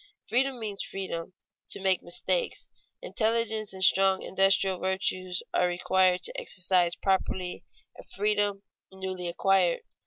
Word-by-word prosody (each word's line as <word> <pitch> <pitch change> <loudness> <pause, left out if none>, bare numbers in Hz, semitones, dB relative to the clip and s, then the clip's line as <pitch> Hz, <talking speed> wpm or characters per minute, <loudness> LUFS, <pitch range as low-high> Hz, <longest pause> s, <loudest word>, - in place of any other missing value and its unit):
Freedom 255 +2 +1
means 210 -3 -2
freedom 185 -2 -5 0.4
to - - -5
make 190 -1 +2
mistakes. 475 - -1 0.3
Intelligence 220 - 0
and 190 0 -4
strong 190 0 +4
industrial 195 -1 +2
virtues 185 -1 -2
are 180 - +3
required 180 +1 +2
to - - -2
exercise 180 -2 +2
properly 190 -2 -1 0.4
a - - -10
freedom 205 -1 -1 0.3
newly 190 -2 -5
acquired. 180 0 +2
190 Hz, 120 wpm, -28 LUFS, 185-205 Hz, 0.4 s, strong